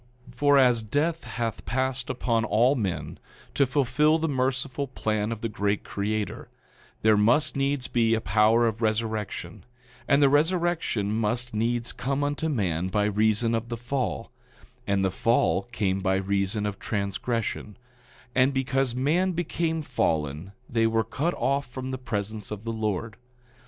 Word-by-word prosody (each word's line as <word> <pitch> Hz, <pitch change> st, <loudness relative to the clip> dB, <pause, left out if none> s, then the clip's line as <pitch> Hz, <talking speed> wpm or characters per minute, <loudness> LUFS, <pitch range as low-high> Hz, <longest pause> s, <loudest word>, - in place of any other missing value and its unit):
9:6 -, -, -21 dB
For 145 Hz, -1 st, +4 dB
as 125 Hz, -4 st, +5 dB
death 150 Hz, +9 st, -1 dB
hath 115 Hz, -2 st, -3 dB
passed 130 Hz, 0 st, -2 dB
upon 115 Hz, -2 st, 0 dB
all 120 Hz, +4 st, +3 dB
men, 90 Hz, -, -3 dB, 0.3 s
to 140 Hz, -, +3 dB
fulfil 140 Hz, +4 st, +2 dB
the 160 Hz, 0 st, -1 dB
merciful 130 Hz, 0 st, -1 dB
plan 110 Hz, -4 st, -2 dB
of 115 Hz, -1 st, -5 dB
the 115 Hz, -, -1 dB
great 100 Hz, -1 st, -1 dB
Creator, 105 Hz, +1 st, -3 dB, 0.5 s
there 110 Hz, 0 st, +5 dB
must 120 Hz, +11 st, +3 dB
needs 140 Hz, -1 st, 0 dB
be 115 Hz, -2 st, +2 dB
a -, -, 0 dB
power 110 Hz, +2 st, +3 dB
of 115 Hz, 0 st, -1 dB
resurrection, 110 Hz, -5 st, -2 dB, 0.4 s
and 140 Hz, -, +4 dB
the 140 Hz, -, +6 dB
resurrection 155 Hz, -, +1 dB
must 115 Hz, +2 st, 0 dB
needs 115 Hz, +2 st, 0 dB
come 135 Hz, +3 st, -2 dB
unto 145 Hz, +3 st, -1 dB
man 95 Hz, -, 0 dB
by 105 Hz, +2 st, +1 dB
reason 110 Hz, +2 st, +2 dB
of 115 Hz, +1 st, -2 dB
the 120 Hz, -, -3 dB
fall; 120 Hz, -1 st, -3 dB, 0.6 s
and 100 Hz, -1 st, +2 dB
the 95 Hz, -, +1 dB
fall 115 Hz, +4 st, +1 dB
came 95 Hz, -4 st, 0 dB
by 95 Hz, -1 st, +1 dB
reason 100 Hz, +2 st, 0 dB
of 105 Hz, -1 st, -3 dB
transgression; 105 Hz, +1 st, -3 dB, 0.6 s
and 130 Hz, +2 st, +3 dB
because 135 Hz, -1 st, 0 dB
man 165 Hz, +9 st, +1 dB
became 165 Hz, -1 st, -1 dB
fallen 80 Hz, -, -1 dB, 0.2 s
they 115 Hz, -1 st, +2 dB
were 115 Hz, 0 st, +1 dB
cut 145 Hz, +10 st, -2 dB
off 140 Hz, +2 st, 0 dB
from 130 Hz, +1 st, -6 dB
the 130 Hz, -, -4 dB
presence 105 Hz, -4 st, -4 dB
of 105 Hz, -1 st, -6 dB
the 115 Hz, 0 st, -3 dB
Lord. 110 Hz, 0 st, -3 dB
115 Hz, 155 wpm, -26 LUFS, 105-135 Hz, 0.6 s, the